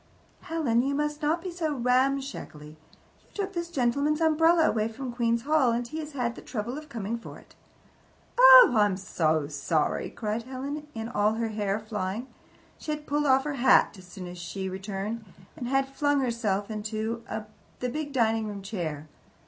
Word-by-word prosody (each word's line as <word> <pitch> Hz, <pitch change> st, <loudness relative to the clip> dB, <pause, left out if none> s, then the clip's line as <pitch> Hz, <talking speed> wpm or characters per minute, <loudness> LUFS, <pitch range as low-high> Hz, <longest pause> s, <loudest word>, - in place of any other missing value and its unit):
"Helen, 315 Hz, -10 st, +1 dB
you 275 Hz, +2 st, -1 dB
must 295 Hz, +1 st, -2 dB
not 320 Hz, +3 st, 0 dB
be 370 Hz, -, -4 dB
so 320 Hz, -4 st, -2 dB
ramshackly. 255 Hz, -, 0 dB
You 155 Hz, +1 st, -23 dB
took 395 Hz, -1 st, -3 dB
this 340 Hz, -1 st, -3 dB
gentleman's 280 Hz, +1 st, +1 dB
umbrella 325 Hz, +1 st, +4 dB
away 215 Hz, -1 st, +1 dB
from 245 Hz, +2 st, -6 dB
Queen's 235 Hz, -1 st, +1 dB
Hall, 290 Hz, -4 st, +3 dB
and 235 Hz, +1 st, -1 dB
he 310 Hz, +5 st, -5 dB
has 305 Hz, -1 st, -7 dB
had 245 Hz, -4 st, -1 dB
the -, -, -11 dB
trouble 235 Hz, +1 st, -4 dB
of 305 Hz, 0 st, -9 dB
coming 230 Hz, -2 st, -4 dB
for -, -, -10 dB
it." -, -, -18 dB, 0.9 s
"Oh, -, -, +10 dB
I 210 Hz, -1 st, +5 dB
am 195 Hz, -2 st, -1 dB
so 160 Hz, -5 st, 0 dB
sorry!" 150 Hz, +2 st, -1 dB
cried 215 Hz, 0 st, -3 dB
Helen, 275 Hz, +4 st, -6 dB, 0.3 s
all 210 Hz, +1 st, +2 dB
her 225 Hz, 0 st, -1 dB
hair 210 Hz, -1 st, -1 dB
flying. 210 Hz, +1 st, -4 dB, 0.5 s
She -, -, -9 dB
had 300 Hz, 0 st, -3 dB
pulled 295 Hz, +1 st, 0 dB
off 265 Hz, 0 st, +4 dB
her 295 Hz, 0 st, -3 dB
hat 260 Hz, -3 st, +5 dB
as 185 Hz, -2 st, -14 dB
soon 180 Hz, 0 st, -8 dB
as 175 Hz, 0 st, -8 dB
she 180 Hz, +3 st, -5 dB
returned, 195 Hz, +4 st, -4 dB, 0.3 s
and 245 Hz, -, -5 dB
had 270 Hz, +1 st, +1 dB
flung 285 Hz, +1 st, +1 dB
herself 225 Hz, -5 st, -1 dB
into 220 Hz, +2 st, -3 dB, 0.6 s
the 250 Hz, -, -2 dB
big 300 Hz, +2 st, -4 dB
dining 225 Hz, -4 st, +1 dB
room 200 Hz, -2 st, -6 dB
chair. 160 Hz, -7 st, -4 dB
235 Hz, 180 wpm, -27 LUFS, 210-290 Hz, 0.9 s, Oh